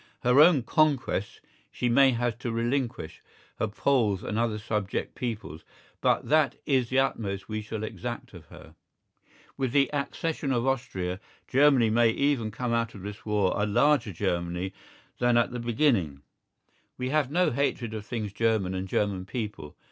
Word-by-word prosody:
Her 125 +3 +4
own 155 -4 +6
"conquests" 140 - 0 0.3
she 125 - -2
may 135 +3 +5
have 120 -1 -1
to 125 -2 -3
relinquish, 120 - -2 0.4
her 110 - +1
Poles 105 -3 +1
and - - -3
other 115 -2 0
subject 105 -2 -3
peoples, 105 - -5 0.4
but - - +2
that 150 -3 +3
is 130 -4 +1
the 130 - 0
utmost 105 -7 -1
we 110 0 -3
shall 110 0 -5
exact 120 +1 -6
of 85 -4 -12
her. - - -14 0.8
With 130 -3 -1
the 140 0 +3
accession 145 0 -2
of 120 -1 +1
Austria, 95 -9 -2 0.3
Germany 135 -4 +4
may 115 +1 +4
even 135 -2 +1
come 120 +3 -3
out 115 -1 -1
of 95 - -10
this 105 +2 -8
war 105 -3 +2
a 105 +1 0
larger 120 +1 +3
Germany 90 0 -2 0.5
than 120 -1 +3
at 120 - +2
the 125 - -4
beginning. 115 - +1 0.7
We 125 0 -2
have 150 -2 +1
no 175 +1 +2
hatred 120 -3 -1
of 110 -2 -5
things 110 -3 -4
German 110 -5 +1
and 95 +1 -3
German 95 -1 -1
people. 105 - -5
115 Hz, 165 wpm, -27 LUFS, 105-135 Hz, 0.8 s, own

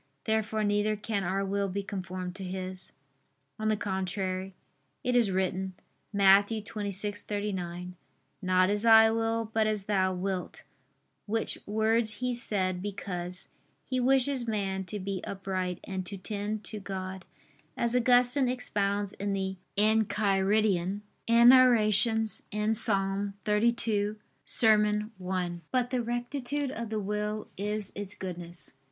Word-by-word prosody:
Therefore 220 0 0
neither 205 +1 +1
can 205 -1 -2
our 195 +2 -1
will 200 0 -1
be 200 +2 -3
conformed 185 -2 -5
to 195 - -7
His. 185 0 -6 0.7
On 215 - -1
the 215 -1 +2
contrary, 190 -1 -3 0.5
It 250 0 0
is 235 -4 +4
written 190 0 -1 0.4
(Matt. 200 0 +6
26:39): 205 -4 -4 0.5
"Not 185 0 +3
as 205 +1 0
I 225 -1 +7
will, 225 0 -1
but 220 -1 +2
as 215 -2 -1
Thou 190 -2 +1
wilt": 185 0 -4 0.6
which 225 +2 -2
words 220 +1 +1
He 250 +1 -2
said, 190 -6 -2
because 180 -2 -5 0.4
"He 255 -1 -1
wishes 260 0 +2
man 195 -3 -2
to 210 - -4
be 195 0 -3
upright 185 -2 -3
and 190 -1 -4
to 200 - -5
tend 210 +2 -4
to 215 - -6
God," 190 -1 -6 0.5
as 235 +1 0
Augustine 250 +2 +3
expounds 205 -5 -1
in 200 0 -3
the 190 -1 -2 0.2
Enchiridion 205 -2 +2 0.3
[*Enarr. 245 +2 +7 0.8
in 210 +1 0
Ps. 200 -2 +1
32, 210 -1 +1 0.3
serm. 210 -1 +4 0.2
i.]. 180 -2 0 0.2
But 250 -1 +1
the 250 -2 +1
rectitude 245 +4 -2
of 230 -4 -5
the 220 -1 -2
will 210 +1 -3
is 210 0 -2
its 205 -1 -3
goodness. 175 -2 -2
205 Hz, 130 wpm, -29 LUFS, 190-220 Hz, 0.8 s, I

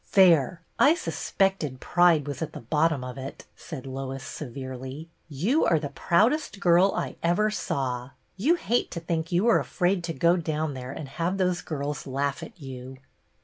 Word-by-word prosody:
" - - -25
There! 170 -5 +5 0.2
I 305 +4 +6
suspected 190 - -1
pride 170 -4 +3
was 145 0 -5
at 160 -1 -3
the - - -6
bottom 150 +3 +1
of 125 +1 -6
it," 135 +1 -8
said 150 -7 -8
Lois, 135 0 -5
severely. 130 +3 -7 0.2
"You 190 - +1
are 165 - +4
the 145 -2 -3
proudest 215 - +1
girl 180 +1 +5
I - - -3
ever 180 +6 +2
saw. 125 -10 -2 0.3
You 280 - +3
hate 245 -8 0
to 170 - -5
think 165 0 -2
you 175 +5 +2
are 230 - +5
afraid 180 -1 0
to 165 - -3
go 170 +5 +3
down 155 -2 -2
there 130 -1 -6
and 145 - -6
have 170 +7 -2
those 180 -3 +1
girls 145 -3 -4
laugh 140 +1 -1
at - - -10
you." 130 -2 -8
160 Hz, 180 wpm, -26 LUFS, 135-180 Hz, 0.3 s, I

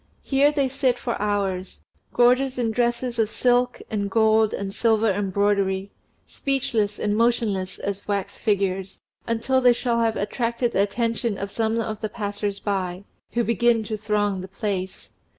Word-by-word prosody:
Here 280 +1 +3
they 285 -3 +1
sit 260 -2 0
for 240 -2 -3
hours, 195 -3 -2 0.3
gorgeous 255 +2 +3
in 235 -2 0
dresses 240 +1 -1
of 220 -2 +2
silk 245 +1 +1
and 200 -2 -1
gold 220 0 +3
and 195 -1 -4
silver 225 -1 +2
embroidery, 195 0 0 0.3
speechless 225 -7 -1
and 210 0 0
motionless 215 -5 +1
as 200 0 -5
wax 200 -2 -2
figures, 195 -3 -1 0.3
until 235 +3 +1
they 250 -1 +6
shall 235 -1 0
have 225 -1 +1
attracted 235 +3 -1
the 195 - +2
attention 230 +1 0
of 200 +1 -5
some 225 +1 0
of 220 -1 -3
the 215 - -2
passers 205 -1 -3
by, 190 -2 -2 0.3
who 235 - +1
begin 235 0 +2
to 215 +1 -3
throng 205 -2 0
the 185 - -7
place. 190 -1 -4
220 Hz, 155 wpm, -24 LUFS, 200-235 Hz, 0.3 s, they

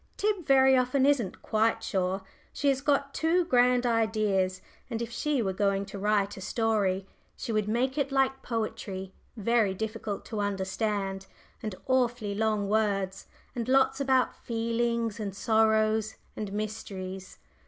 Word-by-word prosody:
Tib 405 -6 0
very 265 -1 +6
often 255 +1 +2
isn't 260 -10 +1
quite 220 +1 +1
sure. 190 0 -1 0.3
She 285 - 0
has 270 -1 +1
got 280 -1 +1
too 340 +2 +2
grand 250 -3 +3
ideas, 215 -5 +1 0.3
and 230 -2 -3
if 235 0 -4
she 275 +1 0
were 190 -2 -1
going 200 0 +1
to 200 - -8
write 205 0 +1
a 190 - -9
story, 200 -2 0 0.3
she 235 - -4
would 215 -2 0
make 255 +6 0
it 280 -1 0
like 270 0 +1
poetry, 195 -4 -4 0.2
very 220 -2 +2
difficult 220 0 -4
to 220 - -4
understand, 195 -1 -2 0.3
and 215 -3 -4
awfully 245 -5 +1
long 215 -1 0
words, 200 -2 0 0.3
and 235 -2 -3
lots 270 +1 +3
about 265 -2 +2
feelings 230 -1 -1
and 200 -3 -4
sorrows 220 0 +2 0.2
and 210 -2 -4
mysteries. 195 -3 -5
220 Hz, 145 wpm, -28 LUFS, 200-250 Hz, 0.3 s, very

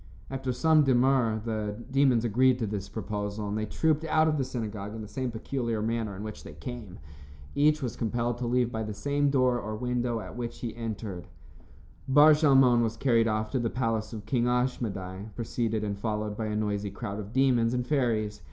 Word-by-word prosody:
After 135 -1 -2
some 155 +5 +4
demur, 125 -4 +3
the 105 -2 -2 0.2
demons 130 -4 +3
agreed 125 +3 +4
to 120 - -1
this 100 -2 -4
proposal, 105 +1 -4
and 105 - -2
they 110 0 -2
trooped 155 +5 +1
out 155 0 +3
of 155 -2 +1
the - - +2
synagogue 110 -5 -5
in 110 - -6
the - - -8
same 130 +3 -3
peculiar 115 0 -2
manner 110 -2 -2
in 100 - -7
which 110 -1 -7
they - - -10
came. 115 -7 -8 0.6
Each 150 +1 +3
was 125 - -3
compelled 120 +1 -1
to 125 - -2
leave 120 0 +1
by 110 - -3
the 105 -1 -4
same 145 +6 +1
door 130 -3 +2
or 110 0 -4
window 125 0 -1
at - - -8
which 120 -1 -5
he 115 -3 -4
entered. 105 -6 -5 0.8
Bar 145 +3 +7
Shalmon 135 -5 +5
was 115 -1 -1
carried 115 -3 +3
off 110 0 -1
to 130 - 0
the 120 -1 0
palace 115 -4 -1
of 105 -2 -7
King 120 +2 +1
Ashmedai, 110 -6 -2
preceded 115 -2 -2
and 100 -1 -2
followed 105 -1 -2
by 110 0 -3
a 105 - -2
noisy 105 -1 -1
crowd 100 0 -5
of 105 0 -7
demons 125 -3 +3
and 125 -1 -1
fairies. 115 -8 0
115 Hz, 200 wpm, -28 LUFS, 105-130 Hz, 0.8 s, Bar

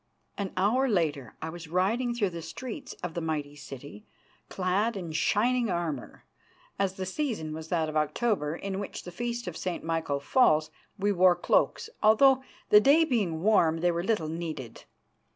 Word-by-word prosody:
An 200 -2 -3
hour 240 +8 +2
later 155 - -1
I 160 - -3
was 170 -1 -9
riding 220 +9 0
through 205 -6 0
the 170 -1 -6
streets 215 +9 -7
of 180 -2 -3
the 170 - -3
mighty 150 -3 -3
city, 145 - -10 0.4
clad 195 +4 0
in 175 -4 -5
shining 230 +8 +2
armour. 165 -7 -4 0.5
As 195 -1 0
the 190 - -4
season 190 - -3
was 160 0 -7
that 160 -2 0
of 155 - -6
October, 155 0 0
in 195 +1 -4
which 200 - -6
the 180 - -8
Feast 240 +4 -4
of 180 - -5
St. 180 0 -4
Michael 165 -3 -1
falls, 155 - +3 0.3
we 205 +1 +1
wore 185 -2 +5
cloaks, 175 - +1
although, 260 +5 +6 0.3
the 210 - +9
day 300 +7 +5
being 195 - -1
warm, 165 -6 +3
they 175 0 +3
were 170 0 -2
little 205 -6 0
needed. 155 -7 -6
180 Hz, 170 wpm, -28 LUFS, 160-215 Hz, 0.5 s, the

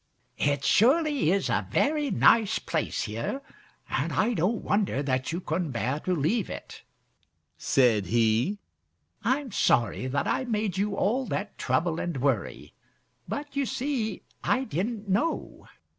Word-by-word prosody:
"It 140 -1 +1
surely 285 - +4
is 195 +1 +2
a - - 0
very 295 -1 +1
nice 225 -5 +4
place - - -2
here, 115 - -4 0.4
and - - -1
I 230 +3 +1
don't 210 +4 0
wonder 200 -9 0
that 130 0 -1
you 170 - -2
couldn't 165 -4 -2
bear 130 +5 -1
to 180 +3 -1
leave 180 - 0
it," - - -8 0.7
said 115 -7 +2
he. 115 - +2 0.7
"I'm 270 -1 0
sorry 120 - +2
that 140 +2 -1
I 260 - 0
made 215 -5 -1
you 200 +1 0
all 245 +7 0
that 205 +1 -3
trouble 160 +6 0
and 170 -5 -3
worry, 130 -5 -1 0.5
but 285 0 -5
you 280 -2 0
see 245 -6 -2 0.2
I 260 - +2
didn't 215 - -3
know." 210 - -1
195 Hz, 145 wpm, -27 LUFS, -, 0.7 s, surely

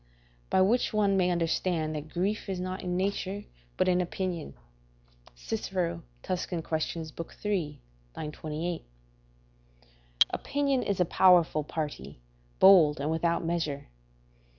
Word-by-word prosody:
["By 190 - +3
which 225 +5 +2
one 205 -2 +3
may 180 -2 +3
understand 165 -2 0
that 150 0 -5
grief 195 +5 -2
is 190 -2 -2
not 185 +1 -4
in 180 -1 -2
nature, 200 +1 -2 0.3
but - - +2
in 180 0 +3
opinion." 180 -2 -3 0.8
Cicero, 85 +7 -3 0.2
Tusc. 180 -1 -2
Quaes., 160 0 -3 0.3
iii. 175 -8 -1 0.4
28.] 155 +2 -4 1.5
Opinion 280 -2 0
is 200 -5 -1
a 180 - +4
powerful 170 -3 +4
party, 145 - -5 0.4
bold, 170 -7 +7
and 145 +3 -1
without 170 +1 0
measure. 160 - -2
175 Hz, 115 wpm, -29 LUFS, 155-190 Hz, 1.5 s, bold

